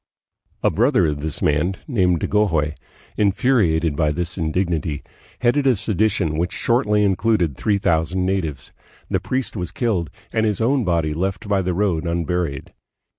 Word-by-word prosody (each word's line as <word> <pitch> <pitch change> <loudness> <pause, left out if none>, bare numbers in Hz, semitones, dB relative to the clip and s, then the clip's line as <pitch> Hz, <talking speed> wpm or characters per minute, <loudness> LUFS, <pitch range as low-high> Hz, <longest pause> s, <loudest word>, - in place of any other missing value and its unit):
A - - +3
brother 120 -4 +3
of 75 -2 -1
this 75 0 -3
man, 75 +6 +1
named 90 - +1
Dagohoy, 80 -8 +1 0.4
infuriated 100 - +2
by 75 -1 +1
this 85 +3 -3
indignity, 80 -3 -1 0.4
headed 135 +3 +2
a 130 - +5
sedition 100 -6 0
which 90 +1 0
shortly 105 -3 +2
included 95 - +1
three 105 - +1
thousand 85 0 0
natives. 90 -7 -2 0.4
The - - +2
priest 130 -2 -2
was 90 -4 -4
killed, 100 - -1 0.2
and 110 - +1
his 105 -3 0
own 130 +3 +2
body 85 -5 0
left 95 +5 -3
by 100 -1 +2
the 90 -1 -1
road 90 -4 0
unburied. 85 -4 -2
90 Hz, 150 wpm, -21 LUFS, 80-105 Hz, 0.4 s, a